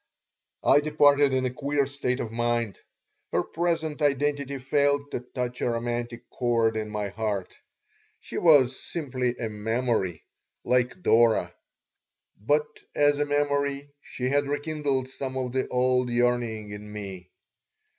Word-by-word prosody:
I - - +6
departed 145 -2 +4
in 130 -1 +1
a 125 - -2
queer 140 +1 0
state 135 -2 -2
of 110 - -4
mind. 120 -3 -1 0.5
Her - - +1
present 165 -3 -2
identity 140 -1 0
failed 145 +1 +1
to - - -2
touch 125 0 -5
a - - +1
romantic 120 0 -3
chord 115 -2 +1
in 110 -1 -3
my 105 -1 -3
heart. 105 -2 -3 0.6
She - - -5
was 140 -6 +5
simply 130 -6 -2
a 115 - -3
memory, 110 -4 -1 0.4
like 125 +8 +1
Dora. 115 -4 +4 0.8
But 145 +9 +1 0.3
as 145 0 +3
a 145 - +2
memory 145 -1 0
she 125 0 -4
had 145 +1 +1
rekindled 145 -2 -1
some 130 0 -5
of 125 -1 -2
the 130 +1 0
old 125 0 +1
yearning 120 -3 0
in 105 0 -8
me. 95 -4 -7
125 Hz, 135 wpm, -26 LUFS, 115-145 Hz, 0.8 s, I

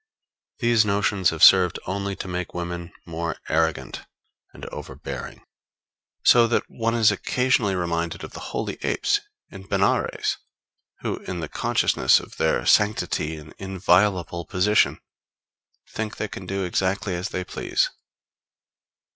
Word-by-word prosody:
These 120 -3 +3
notions 100 -2 +1
have 80 -1 -2
served 90 -2 +7
only 100 +1 -3
to 95 - -7
make 90 -1 -4
women 85 0 -5
more 85 0 -4
arrogant 80 -5 0 0.5
and - - -11
overbearing; - - -8 0.8
so 120 -1 +6
that 115 - +1
one 115 0 -2
is 110 -2 +5
occasionally 120 -1 +1
reminded 85 -1 -2
of - - -8
the - - -9
holy - - -4
apes 410 0 +1 0.3
in 95 0 -11
Benares, 100 0 0 0.6
who - - -2
in 90 - -3
the 80 - -4
consciousness - - +2
of - - -12
their - - +1
sanctity 105 -6 +2
and 75 0 -12
inviolable 95 -2 +1
position, 100 +4 +2 0.9
think 110 -1 -4
they 110 - -2
can 95 -2 -9
do 95 0 -2
exactly 95 +2 -1
as 90 +3 -3
they 90 - -3
please. - - -1
95 Hz, 130 wpm, -24 LUFS, 85-105 Hz, 0.9 s, served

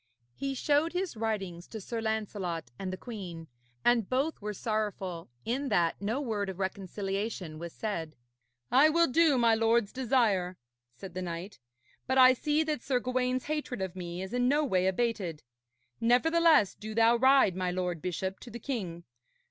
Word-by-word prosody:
He 275 - -3
showed 295 +5 +2
his 365 -3 -2
writings 195 -6 -3
to 220 - -7
Sir 225 +3 -4
Lancelot 200 - -3
and 190 -1 -3
the 185 - -5
queen, 185 -8 -7 0.4
and 235 -4 +3
both 270 +3 0
were 210 +1 -3
sorrowful 200 - -3 0.2
in 265 +4 -1
that 175 -5 +1
no 220 +6 -1
word 215 -7 -2
of 190 - -6
reconciliation 195 -2 -3
was 170 0 -6
said. 165 -8 -4 0.6
'I 280 +5 +6
will 335 +2 +4
do 315 -1 +4
my 235 -2 +4
lord's 225 -1 +2
desire,' 225 -9 +1 0.4
said 190 +7 -9
the 185 - -4
knight, 175 +1 -6 0.5
'but 260 0 +1
I 255 0 +8
see 300 +4 +1
that 305 -5 -2
Sir 255 -1 0
Gawaine's 255 0 0
hatred 300 -6 -3
of 190 -1 -4
me 175 0 -5
is 190 +4 -7
in 245 0 +2
no 295 +3 +3
way 185 -7 +2
abated. 190 -6 -1 0.6
Nevertheless, 310 - +4
do 215 0 -8
thou 230 +1 +5
ride, 260 -6 +5
my 185 -1 -1
lord 180 -2 -2
bishop, 185 +2 -3
to 245 - -11
the 235 - -7
king. 195 -10 -4
220 Hz, 170 wpm, -30 LUFS, 185-255 Hz, 0.6 s, I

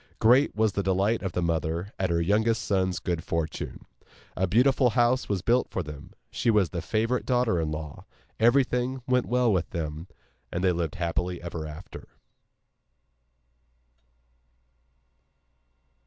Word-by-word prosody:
Great 125 +6 +4
was 110 0 +2
the 100 - -1
delight 95 +4 +1
of 95 -3 -4
the 90 - -1
mother 85 +3 -2
at 95 -1 0
her 85 0 +1
youngest 110 +6 +1
son's 95 -2 0
good 85 -2 -2
fortune. 80 -2 -4 0.5
A 95 - 0
beautiful 125 +5 +4
house 120 +2 +2
was 95 -3 -1
built 120 +4 +2
for 95 - -3
them; 75 -2 -10 0.2
she 120 - 0
was 105 -6 +3
the 85 - -3
favourite 115 +7 0
daughter 120 -9 +1
in 80 - -2
law; 75 -1 -6 0.3
everything 125 +1 +2
went 125 -1 +1
well 125 -2 +2
with 90 -3 0
them, 80 0 -5 0.4
and 90 - -3
they 95 - +4
lived 85 -3 -2
happily 90 +1 -2
ever 85 -2 -6
after. 75 +5 -10
95 Hz, 140 wpm, -27 LUFS, 85-120 Hz, 0.5 s, Great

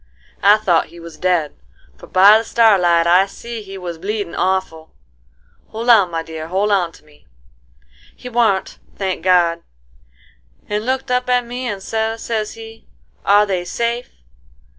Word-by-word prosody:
I 205 +2 +6
thought 185 -6 +1
he 170 - -14
was 165 -2 -11
dead, 175 -5 0 0.4
for - - -14
by 200 +4 +6
the - - -4
starlight 185 -8 +3
I 180 +3 +4
see 235 +2 -8
he 195 -1 -10
was 175 -3 -7
bleedin' 200 -1 -4
awful,—hold 160 - -5
on, 200 -6 +5
my 165 -1 -3
dear, 160 -1 -8
hold 195 +4 0
on 180 -4 +1
to - - -19
me,—he 60 - -20
warn't, 225 -5 0 0.2
thank 190 -3 -3
God, 175 -2 +3 1.1
and 210 +2 -3
looked 260 0 -2
up 250 0 0
at 250 -1 +2
me 245 +2 -5
and 200 -4 -5
sez, 225 +1 -3
sez 215 -2 -3
he, 225 0 -13 0.4
'Are 205 +1 +4
they 185 -3 -2
safe? 235 +5 -3
195 Hz, 150 wpm, -18 LUFS, 170-225 Hz, 1.1 s, I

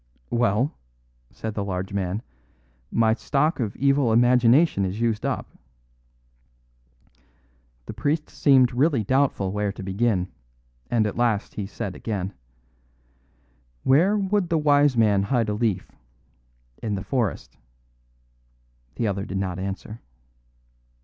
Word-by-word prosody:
"Well," 120 +4 +1 0.6
said 110 -1 -6
the 105 - -2
large 95 0 -4
man, 100 +3 -2 0.7
"my 110 -1 +3
stock 145 +6 0
of 110 -3 -2
evil 140 -3 +2
imagination 120 +1 +4
is 95 +3 -3
used 115 -2 0
up." - - -2 2.4
The - - -7
priest 145 +8 -1
seemed 130 -4 +3
really 135 -2 +2
doubtful 130 -5 +1
where 105 0 -1
to 100 - -9
begin, 95 -1 0 0.6
and 115 -3 +2
at 105 - -3
last 115 -4 0
he 100 -2 -4
said 100 -2 -5
again: 100 -4 -4 1.5
"Where 175 +10 +4
would 195 -3 0
a 165 - +3
wise 145 -3 +3
man 105 -3 +4
hide 115 +1 0
a - - 0
leaf? 105 -4 -1 0.9
In 105 -3 -2
the 95 - -4
forest." 115 -1 -2 1.4
The 115 - -1
other 100 -1 -2
did 95 - -5
not 95 -2 -3
answer. 100 +3 -6
110 Hz, 125 wpm, -24 LUFS, 100-135 Hz, 2.4 s, imagination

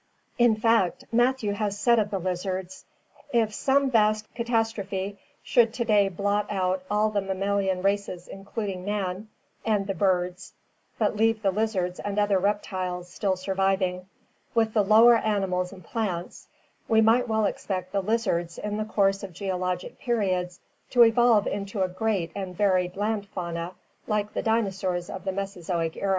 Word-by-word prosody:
In 240 -2 +5
fact, 225 +2 +2
Matthew 240 -2 +2
has 205 -1 -2
said 235 +3 +4
of 205 -1 0
the 200 - -2
lizards: 185 0 -4 0.5
"If 225 -3 +2
some 270 +3 +2
vast 215 -1 +2
catastro 225 -2 0
phe 195 +1 -4 0.3
should 235 -2 +3
to 235 - -1
day 205 -3 +4
blot 200 +2 0
out 185 -2 0
all 210 +1 +2
the 205 -1 0
mammalian 195 -1 -1
races 195 -3 -1
including 195 -1 -5
man, 200 0 -3 0.3
and 210 -3 +1
the 195 - -2
birds, 180 -2 -1 0.4
but - - +1
leave 225 0 +2
the 195 - +3
lizards 190 -3 -1
and 205 0 -4
other 205 -2 +3
reptiles 185 -3 -2
still 195 0 0
surviving, 190 -1 0 0.5
with 225 -1 +2
the 215 - +4
lower 225 +4 +7
animals 190 -5 -1
and 185 -2 -12
plants, 185 -4 -4 0.4
we 220 - +4
might 235 +3 +4
well 220 -1 +1
expect 185 -2 -3
the 200 - 0
lizards 190 -5 -1
in 210 0 -3
the 215 - -2
course 195 -2 +1
of 195 -3 -8
geologic 180 -1 -3
periods 185 -7 -1 0.3
to 245 -2 +6
evolve 230 -2 +4
into 200 0 -2
a - - +1
great 185 -2 -1
and 190 -3 -5
varied 185 -3 +1
land 205 0 -1
fauna 170 -2 -5 0.3
like 210 0 -1
the - - -1
dinosaurs 190 -5 -1
of 190 0 -7
the 190 - 0
Mesozoic 180 -4 -3
era." 200 - -2
200 Hz, 160 wpm, -26 LUFS, 185-220 Hz, 0.5 s, lower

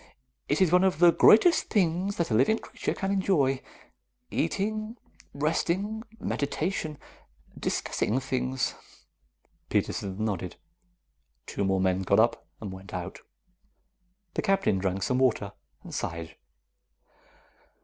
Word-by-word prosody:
It 145 - +1
is 180 -4 +4
one 180 +1 +5
of 190 -5 +2
the 175 +1 +7
greatest 335 - +6
things 190 0 +1
that 170 -7 -1
a - - +2
living 135 - +4
creature - - -4
can 195 0 -2
enjoy. 160 -9 +2 0.7
Eating, 215 - -1 0.3
resting, 170 +8 -1 0.2
meditation, 155 +1 -2 0.6
discussing 120 +5 -1
things." 130 -1 -1 1.0
Peterson 100 +2 -1
nodded. 95 -4 -3 0.9
Two 100 - -3
more 95 -1 +1
men 95 0 +1
got 100 +2 +3
up 115 +1 +2
and 105 -3 -6
went 95 0 -9
out. 90 -1 -5 1.1
The - - -1
Captain 195 - +2
drank 95 0 -1
some 125 -1 +1
water 110 -6 +1 0.3
and - - -10
sighed. 80 -1 -4
135 Hz, 120 wpm, -28 LUFS, -, 1.1 s, the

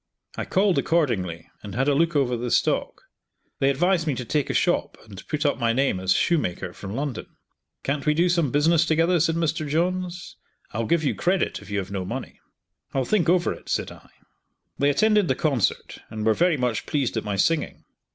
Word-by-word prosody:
I - - -3
called 190 -1 +2
accordingly, 110 - 0
and 100 -2 -8
had 135 +3 +1
a 145 - +4
look 165 +3 +1
over 130 -4 +2
the 120 +1 -3
stock. - - 0 0.6
They 135 - +3
advised 170 +4 +1
me 145 - +1
to 125 - -5
take 145 +3 -1
a - - 0
shop - - +1
and 100 -2 -11
put 150 0 -2
up 145 - +1
my 115 -1 +2
name 130 -6 +1
as 95 0 -1
shoemaker, 150 - 0
from 100 +2 -7
London. 140 -2 -4 0.6
"Can't 140 +2 -2
we 150 - +3
do 170 +3 +3
some 170 -5 +2
business 155 +5 +3
together?" 165 +2 +2
said 165 +1 +2
Mr. 160 -2 -1
Johns, 180 +3 -2 0.3
"I'll 110 +1 -2
give 170 -2 +2
you 145 - +1
credit 180 +1 0
if - - -13
you 100 - -2
have 95 -1 -4
no 95 -2 -3
money." 90 - -6 0.6
"I'll 135 -1 +1
think 190 -2 +1
over 175 -1 +2
it," - - -13
said - - -1
I. - - -15 0.7
They 140 - +3
attended 210 +5 +3
the 130 - +1
concert 135 -8 -1
and 110 -1 -5
were 110 - +4
very 170 +4 +2
much 125 -4 -1
pleased 140 -6 -1
at 110 - -1
my 105 -1 -2
singing. 160 +11 0
145 Hz, 205 wpm, -24 LUFS, 120-170 Hz, 0.7 s, a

